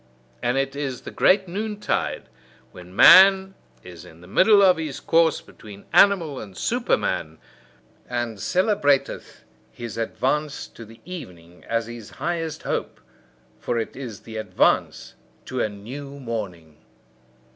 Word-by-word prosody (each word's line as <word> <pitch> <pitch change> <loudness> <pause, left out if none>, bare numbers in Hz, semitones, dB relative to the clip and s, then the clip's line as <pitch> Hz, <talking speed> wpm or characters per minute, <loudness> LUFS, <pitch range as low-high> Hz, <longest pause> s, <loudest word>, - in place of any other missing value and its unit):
And 120 +2 0
it 135 0 -1
is 135 -3 -4
the - - -9
great 190 0 +3
noontide, 210 +3 -3 0.5
when 90 +1 -13
man 190 - +7 0.3
is 90 -2 -11
in 80 +1 -16
the 90 - -14
middle 200 - +5
of 185 -2 +5
his 155 -4 -5
course 165 -1 +2
between 105 -3 -14
animal 170 -9 +4
and 100 -4 -10
Superman, 80 -1 -1 0.7
and 120 -3 -3
celebrateth 175 - 0 0.3
his 120 -3 -8
advance 145 +6 -2
to 115 - -12
the 115 +1 -16
evening 90 - -10
as 115 0 -1
his 115 -2 -10
highest 165 -3 -3
hope: - - -3 0.6
for 120 - -2
it 115 - -4
is 120 -7 -8
the 110 -1 -9
advance 110 - 0 0.3
to 130 -1 -3
a - - 0
new 135 +8 -9
morning. 95 - -6
130 Hz, 135 wpm, -23 LUFS, 105-165 Hz, 0.7 s, man